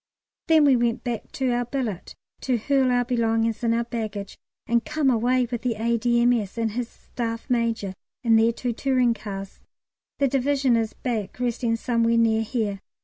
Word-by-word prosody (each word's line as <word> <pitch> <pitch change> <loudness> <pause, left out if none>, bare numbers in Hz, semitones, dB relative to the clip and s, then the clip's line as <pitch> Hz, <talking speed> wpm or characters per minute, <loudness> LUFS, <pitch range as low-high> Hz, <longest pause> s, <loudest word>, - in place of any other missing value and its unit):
Then 315 -2 +5
we 275 -2 +6
went 235 -1 0
back 240 -3 -4
to 260 -2 0
our 245 0 0
billet 240 -7 -4 0.2
to 255 -2 0
hurl 265 +3 +2
our 245 0 +2
belongings 225 -2 0
into 230 0 +2
our 235 - +1
baggage, 215 -4 -5 0.3
and 235 0 +1
came 295 -4 +1
away 245 +2 +2
with 240 -1 -2
the 245 -3 -1
A.D.M.S. 235 -1 +1
and 225 -1 0
his 240 +2 -3
Staff 230 -1 -5
Major 230 -5 0 0.3
in 230 -2 +4
their 225 +1 +5
two 240 +1 -3
touring 250 -1 +2
cars. 195 -3 -7 0.6
The 280 - +2
Division 270 -1 +2
is 225 -1 0
back 225 -4 -4
resting 240 -1 0
somewhere 230 0 +1
near 225 -1 +3
here. 220 -3 -2
235 Hz, 170 wpm, -24 LUFS, 225-250 Hz, 0.6 s, we